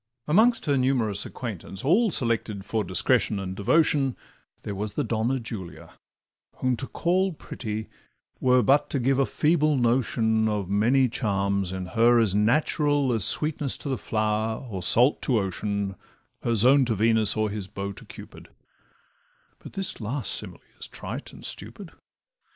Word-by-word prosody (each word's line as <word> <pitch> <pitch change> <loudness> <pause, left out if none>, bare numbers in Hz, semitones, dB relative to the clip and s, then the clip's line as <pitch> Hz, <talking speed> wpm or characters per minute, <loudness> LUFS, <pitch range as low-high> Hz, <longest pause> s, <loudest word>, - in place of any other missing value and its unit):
Amongst 220 +9 +3
her 140 -3 +1
numerous 120 -6 0
acquaintance, 100 -3 -7
all 210 - +3
Selected 115 - -1
for 110 -1 -1
discretion 105 +4 +2
and 95 -1 -5
devotion, 135 +4 +1 0.5
There 105 - -5
was 100 +1 -4
the 145 - -1
Donna 115 +2 -1
Julia, 110 -7 -7 0.6
whom 130 -1 0
to 135 - -4
call 185 +2 0
Pretty 110 -7 -6 0.5
were 125 -1 +3
but 140 +6 +3
to 140 - -1
give 135 +2 +1
a 135 - +2
feeble 155 -2 +1
notion 115 -3 +1
Of 105 -3 -2
many 120 +7 +2
charms 100 -5 -1
in 95 -1 -5
her 120 +4 +3
as 110 -5 +3
natural 140 +5 +1
As 110 -5 +4
sweetness 150 -3 +4
to 145 - -7
the 135 - 0
flower, 110 +2 -2
or 95 -5 -6
salt 120 - +3
to 125 - +1
ocean, 100 0 -2 0.5
Her 115 - 0
zone 130 +6 +5
to 115 -2 -1
Venus, 110 0 +3
or 110 -1 0
his 100 -2 -5
bow 100 0 -5
to 100 - -12
Cupid - - -13 1.1
(But - - -12
this 195 -9 -2
last 120 +3 -2
simile - - -6 0.2
is - - -4
trite - - -7
and - - -12
stupid). - - -6
115 Hz, 155 wpm, -25 LUFS, 105-135 Hz, 1.1 s, zone